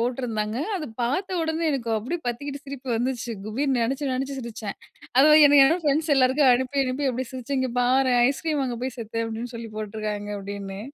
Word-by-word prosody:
போட்டுருந்தாங்க. 230 -3 -2 0.2
அத 315 -5 -4 0.2
பார்த்த 360 +10 -1
உடனே, 320 +1 -1
எனக்கு 240 -4 -2
அப்டியே 315 +11 -4
பத்திக்கிட்டு, 280 +4 -5
சிரிப்பு 270 -1 -8
வந்துச்சு 245 0 -2 0.2
குபீர்னு 260 +4 0
நெனச்சி 270 +4 -1
நெனச்சு 270 +1 -3
சிரிச்சேன். 225 -4 -6 0.4
அது 300 +3 +8
எனக்கு 285 -1 +7
என்ன 330 +6 +2
ஃப்ரெண்ட்ஸ் 305 +2 +2
எல்லாருக்கும் 260 +1 +4
அனுப்பி 260 +3 +1
அனுப்பி 265 +2 -1
அப்படி 255 +1 -3
சிரிச்சு 260 +2 -4
இங்க 260 -1 0
பாரேன். 250 0 +3
"ஐஸ்கிரீம் 300 +2 -1
வாங்கே 245 -3 -3
போய் 260 -1 -3
செத்தேன்" 230 0 -3
அப்பிடீன்னு 230 +2 -5
சொல்லி 230 -1 -7
போட்டுருக்காங்க, 210 -1 -4
அப்பிடீன்னு. 200 0 -6
255 Hz, 175 wpm, -25 LUFS, 230-280 Hz, 0.4 s, அது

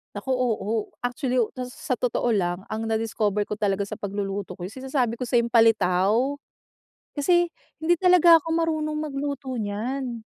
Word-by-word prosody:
Naku, - - -7
oo. 225 -3 -1
Actually, 250 +1 -1 0.2
to 255 - -4
s 250 - -8 0.2
sa 255 - +2
totoo 240 0 0
lang, 175 0 -1
ang 220 +1 -4
na-discover 220 -2 0
ko 210 - -3
talaga 200 -1 0
sa - - -5
pagluluto 200 -1 -4
ko, 175 - -4
yung 210 - -13
sinasabi 255 -4 0
ko 250 - -5
sa'yong 235 -1 +2
palitaw, 225 +3 +3 0.8
kasi 345 +4 +3 0.3
hindi 325 +3 +3
talaga 355 -1 +6
ako 330 - -5
marunong 310 -2 -1
magluto 280 -2 -4
niyan. 235 +3 -3
235 Hz, 155 wpm, -25 LUFS, 210-275 Hz, 0.8 s, talaga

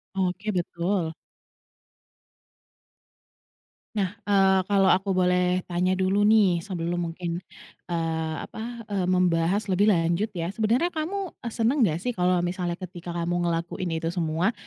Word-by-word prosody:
Oke, 190 +2 -1
betul. 175 -1 -1 2.8
Nah, 195 -3 0 0.2
eee, 195 -1 +4
kalau 195 -2 +4
aku 190 +1 +1
boleh 180 0 +2
tanya 180 +2 +1
dulu 195 +2 +2
nih, 200 -6 +5
sebelum 175 -1 -3
mungkin, 170 0 -4 0.5
eee, 160 -2 -2
apa, 230 +1 -7
eee, 190 -3 0
membahas 185 +2 +2
lebih 200 +3 +3
lanjut, 170 +2 +2
ya. 170 +2 -2
Sebenarnya 235 - +1
kamu, 360 +4 -3
eee, 235 - -7
senang 245 +5 +2
nggak 170 -7 +2
sih, 250 - 0
kalau 180 -4 +1
misalnya 175 -1 -2
ketika 175 -1 -8
kamu 175 +1 0
ngelakuin 170 0 -2
itu 165 +1 -2
semua? 170 +3 0
180 Hz, 130 wpm, -26 LUFS, 170-200 Hz, 2.8 s, nih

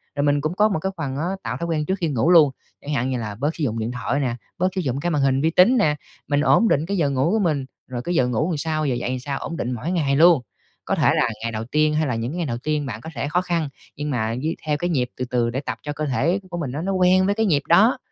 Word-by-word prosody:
rồi 145 - 0
mình 145 0 +2
cũng 155 +3 -1
có 210 +2 +4
một 190 - -1
cái 190 +4 -2
phần 140 -4 -3
á, 155 - -1 0.2
tạo 120 +1 -3
thói 170 - -3
quen 155 -3 -1
trước 190 - 0
khi 170 - 0
ngủ 145 +3 +1
luôn. 155 -5 +7 0.3
Chẳng 150 - -4
hạn 130 -2 0
như 130 - -1
là 105 -3 -5
bớt 145 +8 -2
sử 160 - -4
dụng 115 -4 -1
điện 110 +2 -2
thoại 125 +2 -2
nè, 125 -4 -1 0.2
bớt 185 0 +2
sử 190 - 0
dụng 135 -4 -2
cái 175 - -1
màn 150 -3 +1
hình 135 0 +2
vi 160 - +3
tính 185 +10 +5
nè, 155 -10 +3 0.3
mình 145 -1 +2
ổn 230 +8 +4
định 150 -6 +2
cái 200 +3 -2
giờ 150 -5 +2
ngủ 135 +4 +1
của 220 - +2
mình, 155 -8 0 0.2
rồi 125 -2 -4
cái 175 +7 -2
giờ 125 - +3
ngủ 125 +6 0
làm 165 - -1
sao, 155 +1 -1
giờ 130 -4 0
dậy 120 0 -3
làm 130 0 -2
sao 135 +2 -4
ổn 165 - -5
định 125 - -2
mỗi 125 +8 -3
ngày 150 -6 +1
luôn. 165 -1 +6 0.5
Có - - +1
thể - - +3
là - - +2
ngày 115 0 -2
đầu 110 0 -4
tiên 150 +4 +2
hay 155 0 +1
là 125 - -1
những 115 +3 -3
cái 170 - -5
ngày 175 - -1
đầu 120 -5 -2
tiên 150 +3 -2
bạn 115 -4 -6
có 160 - -8
thể 125 +4 -2
khó 175 +4 +1
khăn 170 -4 -1 0.3
nhưng 150 +1 -4
mà 115 -5 0
với 155 +6 -2
theo 150 -1 +1
cái 175 +4 -2
nhịp 130 -7 0
từ 125 - -2
từ 120 -2 0
để 125 +3 -2
tập 140 - -4
cho 145 - -4
cơ 155 +1 -3
thể 150 +7 +1
của 175 - -5
mình 150 -7 -3
á 145 +4 -4
nó 190 +3 -2
quen 185 0 +4
với 200 +1 +1
cái 220 +1 +1
nhịp 150 -8 +2
đó 200 +9 +5
150 Hz, 320 wpm, -22 LUFS, 130-170 Hz, 0.5 s, luôn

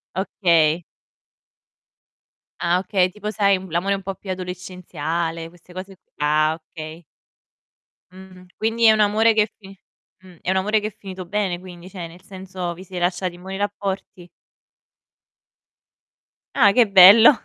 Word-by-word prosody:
Okay. 170 -4 +2 1.8
Ah, 175 +1 +1
okay, 185 -1 +1
tipo, 210 +3 -6
sai, 200 -2 +2
l'amore 180 +4 0
un 195 - -6
po' 195 0 -5
più 195 - -13
adolescenziale, 175 -3 -4
queste 175 +1 -19
cose 190 +1 -9
qu - - -54
ah, 155 +1 +2 0.2
okay. 160 +1 -9 1.1
Mh. 185 -1 -14
Quindi 225 +1 +1
è 220 - +8
un 215 - +1
amore 215 +2 +4
che 215 - +4
è 210 - -4
fi 195 -2 -14 0.5
mh, 180 -2 -15
è - - -1
un 190 - +1
amore 210 +3 +1
che 210 - -4
è 210 - -14
finito 190 -3 -9
bene, 195 -2 -1
quindi, 180 -1 -12
cioè 180 -3 -7
nel 170 +2 -14
senso 185 -2 -6
vi 180 +2 -12
siete 180 -1 -6
lasciati 180 0 -1
in 175 - -14
buoni 190 +1 -6
rapporti? 195 -3 -4 2.3
Ah, 210 -6 +6
che 230 +2 +4
bello. 200 +5 +9
185 Hz, 150 wpm, -21 LUFS, 175-200 Hz, 2.3 s, bello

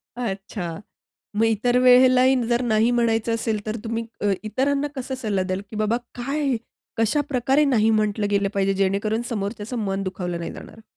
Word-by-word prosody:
अच्छा, 195 -6 -4 0.6
मग 220 - +2
इतर 230 +3 +2
वेळेलाही 255 +1 +6
जर 240 +1 +1
नाही 225 -1 +2
म्हणायचं 230 -1 +1
असेल 220 -2 -2
तर 215 0 -2
तुम्ही 230 0 -3 0.2
अ, 205 -1 +2
इतरांना 275 +6 0
कसा 265 0 -4
सल्ला 210 -7 -1
द्याल? 185 +1 -2
की - - -9
बाबा 215 +2 +1 0.2
काय 275 +1 -1 0.4
कशाप्रकारे 270 +3 +2
नाही 225 -6 +3
म्हटलं 215 -1 +1
गेलं 200 -1 +2
पाहिजे 195 -1 +1
जेणेकरून 200 +4 0
समोरच्याचं 215 +2 -4
मन 195 0 -2
दुखावलं 180 -2 -4
नाही 170 - -5
जाणार. 225 - -11
225 Hz, 160 wpm, -23 LUFS, 200-250 Hz, 0.6 s, वेळेलाही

